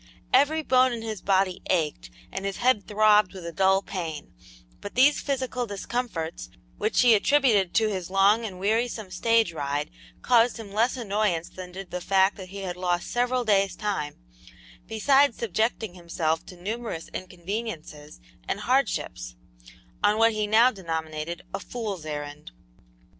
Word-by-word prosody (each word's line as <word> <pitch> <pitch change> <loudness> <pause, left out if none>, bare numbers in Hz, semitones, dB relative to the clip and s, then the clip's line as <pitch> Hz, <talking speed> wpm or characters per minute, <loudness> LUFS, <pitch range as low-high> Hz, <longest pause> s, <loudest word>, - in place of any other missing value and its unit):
Every 295 +4 +4
bone 255 -2 +4
in 230 -1 -5
his 220 -3 -5
body 190 -2 +1
ached 150 - 0 0.2
and 195 - -5
his 195 -1 -3
head 240 -4 +2
throbbed 210 -2 +4
with 185 -3 -8
a 170 - -4
dull 190 +3 +3
pain, 165 -7 -6 0.5
but 205 - -8
these 275 +4 +5
physical 260 -3 -2
discomforts, 200 - -4 0.3
which 215 - +2
he 245 -2 +6
attributed 220 -5 +3
to 220 +1 +4
his 185 -4 -3
long 200 +4 +4
and 190 -5 -6
wearisome 220 0 -1
stage 225 0 +2
ride, 145 0 -3 0.3
caused 240 0 +4
him 220 -3 -9
less 230 +5 +1
annoyance 205 -7 -1
than 185 -1 -9
did 190 0 -9
the 180 - -4
fact 190 +1 +3
that 185 -2 -9
he 200 +1 -7
had 180 -1 -4
lost 175 -1 -1
several 245 +1 +1
days' 195 -2 +2
time, 195 -8 -3 0.7
besides 270 +4 +3
subjecting 220 -2 -1
himself 170 -2 -2
to 180 - -12
numerous 215 -3 -5
inconveniences 180 - -6 0.3
and - - -2
hardships, - - -1 0.7
on 210 - +4
what 225 +1 +5
he 215 -1 -1
now 230 +4 +5
denominated 165 -3 -5
a - - -2
"fool's 205 -9 -5
errand." 145 - -6
200 Hz, 155 wpm, -26 LUFS, 175-230 Hz, 0.7 s, he